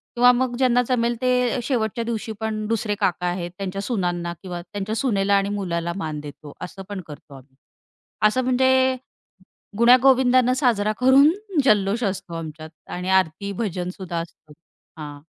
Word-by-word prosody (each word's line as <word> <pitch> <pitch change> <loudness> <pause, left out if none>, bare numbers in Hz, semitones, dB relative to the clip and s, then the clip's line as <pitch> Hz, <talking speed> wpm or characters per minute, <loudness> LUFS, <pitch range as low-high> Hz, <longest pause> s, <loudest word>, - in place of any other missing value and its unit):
किंवा 245 +1 +6
मग 245 0 0
ज्यांना 250 -1 +3
जमेल 240 -1 +1
ते 250 -1 +1
शेवटच्या 230 -3 -1
दिवशी 225 -1 -4
पण 220 -1 -3
दुसरे 220 -2 -1
काका 180 0 0
आहेत 175 -1 -3
त्यांच्या 195 0 -4
सुनांना 175 -6 -2
किंवा 175 -2 -5
त्यांच्या 205 +4 -5
सुनेला 200 -6 +1
आणि 200 0 +1
मुलाला 170 -4 -2
मान 155 -5 -4
देतो 145 0 -11
असं 185 +2 -7
पण 200 -2 -5
करतो 150 -1 -12
आम्ही. 135 0 -17 0.7
असं 255 +4 0
म्हणजे 260 +1 +3 0.8
गुण्या 240 +2 +7
गोविंदांना 255 -1 +4
साजरा 220 -6 +1
करून 270 +4 +6 0.3
जल्लोष 210 -1 +2
असतो 185 -3 -3
आमच्यात 155 -1 -7 0.2
आणि 180 +1 -4
आरती 190 +4 -5
भजन 180 -3 -3
सुुद्धा 175 -3 -4
असतं. 160 -2 -11 0.5
हां. 145 -1 -8
205 Hz, 155 wpm, -23 LUFS, 175-245 Hz, 0.8 s, गुण्या